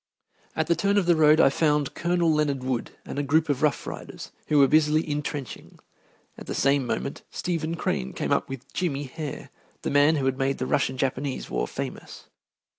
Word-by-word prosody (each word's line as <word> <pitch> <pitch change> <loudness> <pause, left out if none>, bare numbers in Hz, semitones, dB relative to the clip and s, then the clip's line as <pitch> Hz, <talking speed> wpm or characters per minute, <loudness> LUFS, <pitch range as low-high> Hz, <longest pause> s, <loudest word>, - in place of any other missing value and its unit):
At 160 - +1
the 170 +1 +2
turn 200 +3 +1
of 200 - +3
the 175 -1 +4
road 155 0 +5
I 135 - +6
found 150 -2 +1
Colonel 170 -1 +1
Leonard 145 -4 0
Wood 130 -2 -2 0.2
and - - -5
a - - +2
group 155 +3 +2
of 140 -2 0
Rough 150 -2 +1
Riders, - - -8 0.2
who 150 - +2
were 140 -1 +7
busily 155 +2 +3
intrenching. 145 -2 -5 0.6
At - - -11
the - - -3
same 140 -2 +2
moment 65 - -3
Stephen 165 -2 -2
Crane 65 - -2
came - - -3
up - - +1
with 135 -1 -8
"Jimmy" 145 -6 -1
Hare, 145 +1 -7 0.3
the - - -2
man 145 +3 +5
who 140 -3 -1
has 135 - +2
made 135 +1 -1
the 130 - -2
Russian 130 0 0
Japanese 135 +1 -2
War - - -1
famous. - - -7
145 Hz, 195 wpm, -26 LUFS, 135-160 Hz, 0.6 s, were